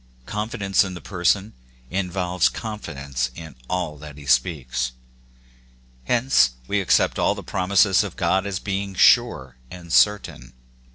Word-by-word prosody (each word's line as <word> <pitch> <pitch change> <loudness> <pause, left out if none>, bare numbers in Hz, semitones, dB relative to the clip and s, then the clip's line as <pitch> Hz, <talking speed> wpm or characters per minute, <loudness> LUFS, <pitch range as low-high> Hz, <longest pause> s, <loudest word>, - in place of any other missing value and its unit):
Confi 105 - -4
dence 100 -2 +2
in 95 -2 -6
the - - -7
Person 95 +3 0 0.4
involves 90 -1 0
confidence 70 - -4
in 80 -4 -10
all 90 -5 -3
that 75 -1 -11
he 75 - -11
speaks: 65 -2 0 1.1
hence 120 - +3
we 105 -1 0
accept 95 - +2
all - - +2
the - - -8
promises 95 +1 +2
of - - -7
God 95 +1 0
as 100 -2 -2
being 100 0 -4
sure 65 -7 +3
and 85 -2 -9
certain. 105 -10 +2
90 Hz, 135 wpm, -23 LUFS, 75-100 Hz, 1.1 s, hence